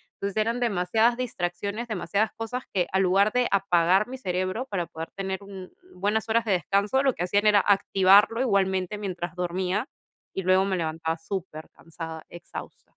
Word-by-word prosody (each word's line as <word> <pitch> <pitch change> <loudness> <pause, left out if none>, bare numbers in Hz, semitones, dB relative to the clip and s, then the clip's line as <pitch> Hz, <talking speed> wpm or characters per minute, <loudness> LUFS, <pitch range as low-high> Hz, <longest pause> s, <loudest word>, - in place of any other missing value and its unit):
Entonces 200 +1 -4
eran 230 +3 +1
demasiadas 225 +2 +2
distracciones, 200 0 -3
demasiadas 210 +1 -1
cosas 245 +3 -4
que, 180 -3 +1
al 190 - +3
lugar 195 +3 +3
de 250 -1 +2
apagar 190 +1 +3
mi 260 +1 -7
cerebro 185 +5 -2
para 180 -4 -2
poder 160 0 -7
tener 190 0 -3
un 190 -2 -10 0.2
un - - -16
buenas 220 +2 0
horas 230 +1 +2
de 210 - 0
descanso, 200 - +1
lo 265 -3 +3
que 175 - -2
hacían 205 +4 +2
era 205 -2 +6
activarlo 200 +3 +4
igualmente 190 -4 +1
mientras 175 -4 -4
dormía 180 +5 -1 0.5
y 190 - -3
luego 185 +1 +4
me 190 -2 -1
levantaba 160 0 -2
supercansada, 165 -2 -7
exhausta. 175 - -10
195 Hz, 165 wpm, -26 LUFS, 180-215 Hz, 0.5 s, era